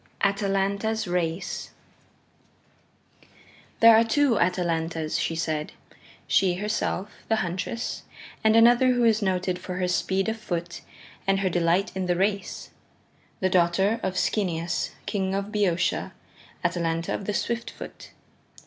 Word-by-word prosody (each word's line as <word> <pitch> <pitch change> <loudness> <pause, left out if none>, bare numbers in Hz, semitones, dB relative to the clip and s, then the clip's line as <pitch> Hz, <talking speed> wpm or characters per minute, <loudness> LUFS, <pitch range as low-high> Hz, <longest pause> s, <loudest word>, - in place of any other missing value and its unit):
Atalanta's 200 +2 0
Race 175 0 -2 2.1
There 230 0 +9
are 225 - +6
two 240 +1 +2
Atalantas, 165 -3 0
she 165 - -1
said; 155 -2 -2 0.5
she 185 -2 +3
herself, 210 0 -2 0.2
the 225 - +4
Huntress, 205 +4 -3 0.4
and 220 0 +4
another 240 +3 +6
who 245 -1 +1
is 225 -1 +4
noted 185 -2 0
for 180 0 -6
her 180 0 0
speed 190 +2 0
of 220 0 -1
foot 170 -4 -4 0.5
and 195 0 +2
her 190 - +1
delight 175 +3 +1
in 190 -1 -2
the 175 - +2
race 200 +2 -2 0.7
the 185 - +2
daughter 185 +5 +3
of 190 -1 -2
Schoeneus, 175 -4 0 0.2
King 190 -1 -1
of 200 +1 -3
Boeotia, 185 -5 0 0.5
Atalanta 165 -1 -1
of 200 - -4
the 210 - -1
Swift 235 0 -2
Foot. - - -10
190 Hz, 130 wpm, -26 LUFS, 175-215 Hz, 2.1 s, There